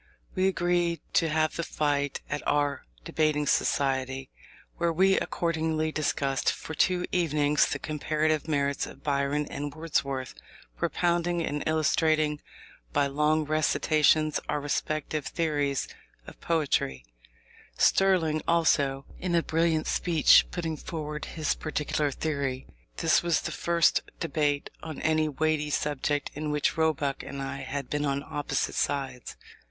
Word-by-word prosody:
We 185 0 +2
agreed 175 -2 +1
to 165 - +3
have 155 0 +1
the - - 0
fight 145 -3 -1
out 145 - +1
at - - -8
our 145 -1 0 0.2
Debating 150 - +1
Society, 135 -2 0 0.5
where 170 0 +1
we 190 +4 +4
accordingly 160 -2 -1
discussed 140 -3 0
for 160 - -7
two 180 +3 +2
evenings 150 -4 +2
the - - -2
comparative 155 0 -1
merits 140 -2 0
of 135 - -13
Byron 140 +1 0
and 145 0 -5
Wordsworth, 140 -5 -2 0.4
propounding 175 - 0
and 145 +1 -3
illustrating 155 -1 +2 0.5
by 140 - +2
long 150 +2 +1
recitations 155 0 +2
our - - 0
respective 150 0 -2
theories 145 -4 -1 0.4
of - - -13
poetry: 140 - 0 0.7
Sterling 170 -5 +3
also, 140 -5 +2
in 180 -2 -1
a 170 - +3
brilliant 160 -1 +1
speech, 165 -4 +4
putting 165 -3 -3
forward 150 -1 -5
his 155 -2 -1
particular 150 -1 -1
theory. 140 -3 -2 0.3
This 165 -2 +3
was 170 -2 +1
the - - -4
first 170 -1 +2 0.2
debate 145 -2 -1
on 160 -2 -7
any 155 -1 +2
weighty 150 +1 0
subject 145 0 -1
in 150 +1 -4
which 150 -1 0
Roebuck 155 -4 0
and 140 - -7
I 135 0 -4
had 140 0 -5
been 150 0 -1
on 140 0 -1
opposite 145 -1 -2
sides. 135 -3 -2
155 Hz, 135 wpm, -28 LUFS, 145-160 Hz, 0.7 s, we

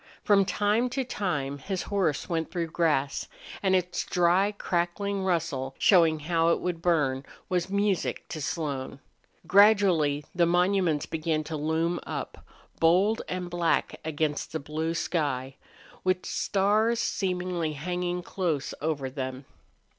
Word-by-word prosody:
From 200 -2 +4
time 210 +6 +1
to 265 - +2
time 145 - -2
his 190 +6 -3
horse 185 -8 0
went 165 -2 -2
through 170 -3 -3
grass, 150 -5 0 0.3
and 190 -1 +3
its 180 -1 0
dry, 180 +3 +2
crackling 195 +1 -1
rustle, 160 -7 -1
showing 165 -5 +4
how 165 +1 +2
it 170 - +2
would 175 -2 -3
burn, 145 -7 +1 0.3
was 180 -1 0
music 200 -2 0
to 155 - -5
Slone. 140 -3 -3 0.5
Gradually 180 -7 +4
the 175 -2 +3
monuments 180 -3 +2
began 155 -1 -1
to 155 +1 -5
loom 160 +3 0
up, - - -6 0.4
bold 185 +7 +3
and 180 -1 -3
black 175 -1 0
against 155 -1 -2
the 160 - -1
blue 155 +3 -3
sky, 135 -6 -2 0.5
with 185 0 0
stars 215 +4 +1
seemingly 180 -6 -1
hanging 180 +3 -3
close 170 -7 -2
over 145 -3 -1
them. 130 0 -5
170 Hz, 130 wpm, -27 LUFS, 155-185 Hz, 0.5 s, From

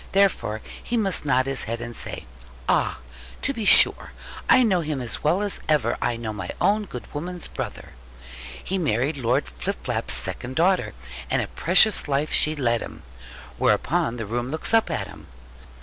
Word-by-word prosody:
Therefore 190 - +1 0.2
he 240 - -2
must 195 -8 +1
nod 130 -2 +2
his 135 -1 0
head, 115 +1 -3
and 120 0 -6
say, - - -4 0.4
'Ah, - - +1 0.5
to 275 - 0
be 225 -5 -4
sure! - - +7 0.4
I 255 - +6
know 190 -6 +2
him 150 -3 -3
as 120 -2 -4
well 175 +7 +2
as 205 - -2
ever 140 -7 +2
I 120 - 0
know 110 -2 -5
my 105 - -6
own 205 +3 +2
good 125 -10 -8
woman's 175 +3 -5
brother. - - -7 0.7
He 190 +1 -2
married 145 -1 0
Lord 130 +3 0
Flipflap's 125 - -3
second 130 +1 -4
daughter, 165 - +1 0.3
and - - +1
a - - -6
precious 185 +4 +3
life 145 +2 -1
she 155 +1 +3
led 120 -5 0
him.' - - -9 0.6
Whereupon 115 +1 +1
the 115 - -4
room 120 +4 -3
looks 160 +8 -2
up 225 -5 +4
at 135 -12 -2
him. 80 -6 -13
145 Hz, 175 wpm, -24 LUFS, 120-185 Hz, 0.7 s, sure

